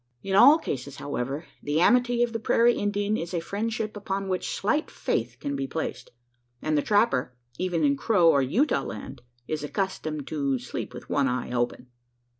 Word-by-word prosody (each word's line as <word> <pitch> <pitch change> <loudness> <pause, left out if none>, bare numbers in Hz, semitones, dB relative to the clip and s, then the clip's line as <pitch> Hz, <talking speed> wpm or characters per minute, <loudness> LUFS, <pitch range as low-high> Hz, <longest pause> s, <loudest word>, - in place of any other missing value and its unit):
In 195 0 -1
all 285 +9 +8
cases, 140 - -5
however, 140 +2 -4 0.2
the 145 +2 0
amity 245 +5 +4
of 240 -1 -1
the 225 - -2
prairie 235 +2 +4
Indian 205 0 0
is 175 -2 -4
a - - +1
friendship 215 +5 -3
upon 195 -1 -3
which 185 -1 -1
slight 300 +10 0
faith 120 +1 -2
can 140 +1 -3
be 135 -1 -2
placed; 135 -5 -4 0.5
and 155 +3 -1
the 145 - +3
trapper 205 - +2 0.2
even 180 -3 0
in 140 -1 +4
Crow 175 +3 +3
or 140 -4 +5
Utah 190 - +2
land 130 +2 -7 0.3
is 155 -1 -3
accustomed 155 -4 -3
"to 140 -4 -1
sleep 125 +1 -6
with - - -9
one 140 -2 +1
eye 125 -1 -2
open." 120 +1 -1
165 Hz, 180 wpm, -26 LUFS, 135-205 Hz, 0.5 s, all